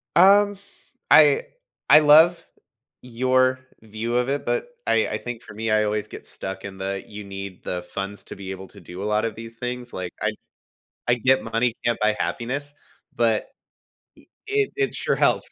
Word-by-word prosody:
Um, 200 +2 +6 0.5
I 150 -2 +7 0.5
I 150 - +10
love 160 +3 +6 0.6
your 130 +1 +1 0.2
view 110 +2 -4
of 125 +1 +1
it, 140 +1 -2
but - - -1 0.2
I - - +2
I - - -2
think 120 -2 -7
for - - -12
me, 110 +1 -2
I 110 0 +3
always 105 0 -1
get - - -10
stuck 95 0 -6
in 95 -1 -8
the, 95 0 -4
"You 105 0 -8
need 100 -1 -8
the 90 -1 -4
funds 95 +2 -5
to - - -8
be 95 -1 -7
able 95 0 -8
to - - -15
do 90 +2 -9
a - - -3
lot 105 +1 +1
of 115 - -3
these 115 +1 -7
things," 125 +1 -5
like, 90 -1 -5
I - - +1 0.8
I 120 - +5
get 130 +2 +2
money 115 +1 0
can't 120 -1 +1
buy 105 0 +2
happiness, 125 +11 -3 0.4
but 115 -2 +1 1.0
e 420 0 +2
it - - -14
it 405 -1 0
sure - - 0
helps. - - +2
115 Hz, 185 wpm, -23 LUFS, 100-130 Hz, 1.0 s, I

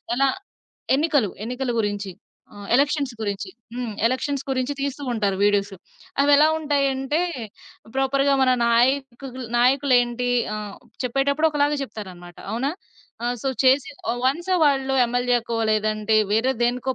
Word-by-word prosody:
ఎలా 275 +1 +3 0.7
ఎన్నికలు, 285 - +2 0.2
ఎన్నికల 250 +2 -3
గురించి. 205 -1 -2 0.4
ఆ! - - -14 0.2
ఎలక్షన్స్ 280 -1 +2
గురించి 200 -2 -3 0.2
హ్మ్. 245 -3 -4
ఎలక్షన్స్ 270 +2 -1
గురించి 260 +1 -1
తీస్తూ 280 0 -3
ఉంటారు 200 -4 0
వీడియోస్. 205 -1 +2 0.5
అవెలా 290 +1 +6
ఉంటయంటే 280 0 0 0.8
ప్రాపర్‌గా 275 +1 +2
మన 255 - +4 0.2
నాయకులు 255 +1 0
నాయకులేంటి 245 -2 +2 0.2
ఆ! - - -3 0.5
చెప్పేటప్పుడు 280 +5 +1
ఒకలాగా 295 0 +1
చెప్తారనమాట 180 -8 -9 0.2
అవునా? 260 +5 -1 0.5
ఆ! - - 0 0.2
సో 270 - 0
చేసి 260 +1 +4 0.2
ఒ - - -2
వన్స్ 335 +8 -1
వాళ్ళు 270 -2 +2
ఎంఎల్ఏకో 240 -1 0
లేదంటే 215 0 +1 0.2
వేరే 240 +5 +2
దేనికో 250 +2 -1
255 Hz, 120 wpm, -23 LUFS, 230-275 Hz, 0.8 s, అవెలా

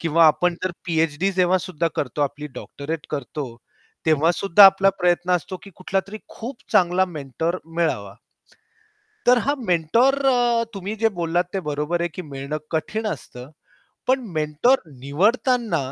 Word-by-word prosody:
किंवा 165 0 +4
आपण 175 +3 +3
जर 185 - 0
पी-एच-डी 165 +2 0
जेव्हा 185 0 +3
सुद्धा 170 -2 -2
करतो 145 +1 -3
आपली 145 +1 -3
डॉक्टरेट 150 +2 -6
करतो, 145 0 -4 0.6
तेव्हा 160 +1 +4
सुद्धा 195 +2 +6
आपला 195 0 +5
प्रयत्न 175 0 +1
असतो, 180 +2 -7
की 200 - -12
कुठला 190 +1 -1
तरी 215 - -7
खूप 240 +4 -7 0.2
चांगला 180 +1 +4
मेंटर 160 0 -3
मिळावा. 160 -12 -2 1.1
तर 245 +1 +6
हा 285 +2 +1
मेंटर 180 - +3 0.6
तुम्ही 200 +2 -5
जे 225 +1 +2
बोललात 170 +1 +1
ते 195 - 0
बरोबर 150 +2 -2
आहे, 175 - +1
की 185 - -5
मिळणं 140 -1 -5
कठीण 215 +7 -2
असतं. 130 - -7 0.6
पण 260 +1 +3 0.2
मेंटर 155 - +2 0.2
निवडताना 205 - +1
170 Hz, 145 wpm, -22 LUFS, 150-195 Hz, 1.1 s, सुद्धा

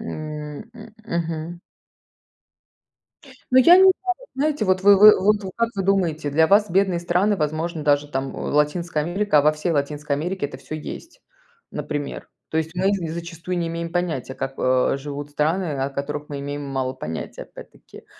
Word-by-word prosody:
М, 150 -7 -6
м 220 -2 -12
мгм. 170 -2 -3 1.9
Ну, 255 - +6
я 335 +8 +8
не 375 - +7
знаю, 380 0 +8 0.4
знаете, 290 -2 0
вот 185 -1 +1
вы 200 0 +7
вы 210 +1 +10
вы 210 +2 +3
вот 190 -1 -6
как 230 0 +1
вы 195 - 0
думаете, 175 -6 0
для 160 +3 +4
вас 205 +3 +4
бедные 185 -1 +2
страны, 180 +4 +1
возможно, 155 +1 -2
даже, 145 0 +2
там, 135 -1 -3
э, - - -7
Латинская 150 +2 0
Америка, 175 +2 +1
а - - +4
во 150 +1 +4
всей 155 +3 -3
Латинской 145 0 -1
Америке 175 +2 -2
это 140 - -10
всё 155 - -8
есть, 335 - -8 0.5
например. 145 -2 -5 0.2
То 160 - 0
есть 160 +1 -2
мы 190 +2 +2
з 170 -5 -2
зачастую 170 +1 -5
не 170 - -1
имеем 170 0 -4
понятия, 160 -8 -2
как, 135 0 -4
э, 130 +1 +2
живут 145 +1 -7
страны, 155 +6 0 0.2
о 135 - -2
которых 145 +2 -5
мы 145 - -5
имеем 145 +1 -5
мало 135 -2 -2
понятия 80 -11 -6
опять-таки. - - -14
160 Hz, 180 wpm, -22 LUFS, 145-190 Hz, 1.9 s, вы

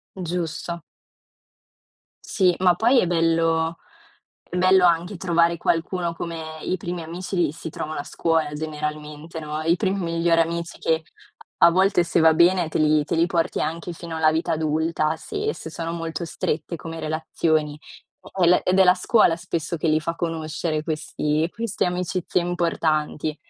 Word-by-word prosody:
Giusto. 170 -1 -4 1.4
Sì, 180 -4 +2
ma 180 -1 +5
poi 240 +6 +4
è - - +1
bello 165 -1 +1 0.7
è 180 - -6
bello 185 0 +5
anche 175 +3 +1
trovare 170 -1 +2
qualcuno, 170 +1 -1
come 160 -2 -6
i 185 - -1
primi 175 0 -5
amici 180 +4 -6
li 170 -5 +2
si 160 +1 -7
trovano 155 0 -5
a 145 - -3
scuola 160 -3 0
generalmente, 150 +1 -5
no, 150 0 -4
i 165 +2 +3
primi 195 +1 -1
migliori 165 -1 +1
amici 170 0 -2
che 160 0 0 0.5
a - - +7
volte 185 0 +3
se 170 - +2
va 160 0 +6
bene 175 +1 +4
te - - -2
li 155 -1 +3
te 170 - -2
li 165 +1 +3
porti 170 -1 -1
anche 170 +2 -3
fino 170 -1 -7
alla 160 -1 +3
vita 165 +1 0
adulta, 155 0 0
se 425 - -3
se - - -8
sono 165 +1 -4
molto 165 0 -4
strette 160 0 -3
come 165 0 -7
relazioni. 155 -1 -1 0.6
E 175 - +5
le 180 - +4
ed 185 +1 +2
è - - +8
la 180 - +7
scuola 185 -2 +3
spesso 170 -1 -3
che 160 0 0
li 155 0 +3
fa 165 +2 -3
conoscere, 160 -1 -3
questi 155 0 -1
queste 230 -2 -2
amicizie 180 0 -1
importanti. 160 -3 -1
165 Hz, 165 wpm, -23 LUFS, 160-175 Hz, 1.4 s, è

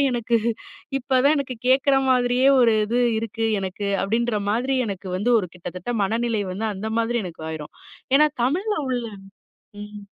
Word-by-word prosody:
எனக்கு 235 -1 0 0.6
இப்ப 270 +1 -17
தான் 295 +2 +5
எனக்கு 265 -3 -3
கேட்குற 270 +2 +4
மாதிரியே 250 +1 +3
ஒரு 235 -2 +5
இது 235 +3 -1 0.2
இருக்கு 225 0 -3 0.2
எனக்கு 195 +2 -4 0.2
அப்படின்ற 230 +2 0
மாதிரி 250 +5 0
எனக்கு 195 -1 -6
வந்து 210 +6 0
ஒரு 190 - -2
கிட்டத்தட்ட 180 +4 -7
மனநிலை 225 +1 0
வந்து 215 +4 -3
அந்த 215 +3 -5
மாதிரி 230 0 0
எனக்கு 165 -3 -8
ஆயிரும். 155 -2 -7 0.4
ஏன்னா 300 +1 +5 0.2
தமிழ்ல 380 - 0
உள்ள 245 -2 -1 0.8
ம். 210 -1 -10
230 Hz, 155 wpm, -23 LUFS, 205-250 Hz, 0.8 s, தான்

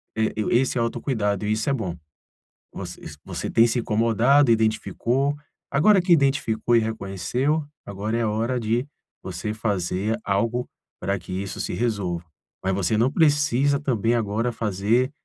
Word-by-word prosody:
eh, 110 0 0 0.2
esse 125 +2 +2
autocuidado, 115 -4 -1
e 105 - 0
isso 110 +4 0
é - - +2
bom. 95 -10 -3 0.8
Voc - - -6 0.4
você - - -4
tem 115 +1 +5
se 120 +2 0
incomodado, 115 +5 +3
identificou. 115 +5 +1 0.3
Agora 190 +7 +4
que 180 0 -1
identificou 135 -7 +3
e - - +6
reconheceu, 110 - -1 0.2
agora 105 +3 -3
é 115 - +1
hora 115 +4 0
de 115 +3 0 0.4
você 105 - -4
fazer 105 0 -1
algo 115 +5 0 0.3
para 100 0 -1
que 90 - -11
isso 95 +1 -4
se - - -3
resolva. 95 -5 -2 0.4
Mas 95 0 +1
você 100 +2 +1
não 120 +4 +3
precisa, 145 -3 +3
também, 120 -4 +1
agora 115 +2 0
fazer 110 +4 0
115 Hz, 145 wpm, -24 LUFS, 105-130 Hz, 0.8 s, e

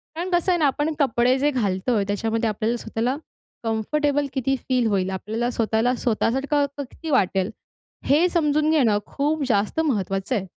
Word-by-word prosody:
कारण 345 +3 -3
कसं 350 +1 +2
आहे 350 - +2
ना, 310 - +3
आपण 295 +3 0
कपडे 250 -1 +3
जे 290 +2 +2
घालतो 210 -2 0
आहे, 205 -2 +1
त्याच्यामध्ये 225 +2 0
आपल्याला 220 +3 -1
स्वतःला 230 +3 -2 0.5
कम्फर्टेबल 285 +6 0
किती 270 0 0
फील 250 -3 +2
होईल? 190 -3 0
आपल्याला 220 +5 -2
स्वतःला 225 +2 +1
स्वतःसारखं 270 +5 +1
क - - -2
किती 325 - -8
वाटेल? 195 -8 +2 0.6
हे 305 +6 +4
समजून 305 -3 +1
घेणं 245 -10 +3
खूप 295 +2 -1
जास्त 205 +8 +1
महत्त्वाचं 195 -3 -1
आहे. 195 -4 -2
245 Hz, 165 wpm, -23 LUFS, 220-290 Hz, 0.6 s, हे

